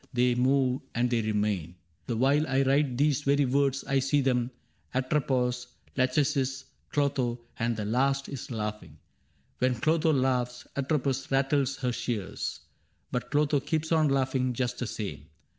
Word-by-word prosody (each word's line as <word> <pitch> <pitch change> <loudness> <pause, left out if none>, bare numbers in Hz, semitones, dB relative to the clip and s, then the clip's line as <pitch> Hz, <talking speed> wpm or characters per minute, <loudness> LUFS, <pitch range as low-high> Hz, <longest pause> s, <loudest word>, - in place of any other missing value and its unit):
They 125 0 +3
move 130 +1 +2
and 120 +1 +1
they 120 -1 +2
remain. 105 -6 -1 0.3
The 120 - -1
while 140 +5 +3
I 135 +1 +2
write 135 -1 +2
These 145 0 +2
very 140 0 +3
words 135 +1 +1
I 135 0 +1
see 135 +2 +2
them, 125 -2 +1 0.2
— - - -23
Atropos, 130 -2 0 0.3
Lachesis, 130 0 +1 0.2
Clotho; 135 -4 0 0.2
and 115 -1 0
the 105 - -3
last 135 +5 +1
is 140 - -7
laughing: 105 - -5 0.6
When 130 0 +2
Clotho 160 +6 +2
laughs, 125 -3 0
Atropos 135 -1 -1
rattles 135 0 +2
her 125 -1 +1
shears; 110 -5 -3 0.5
But 125 -1 -2
Clotho 145 0 +2
keeps 155 +3 -2
on 155 -2 +4
laughing 130 -2 +1
just 125 0 -2
the 125 - -2
same. 80 -10 -5
130 Hz, 150 wpm, -28 LUFS, 120-140 Hz, 0.6 s, on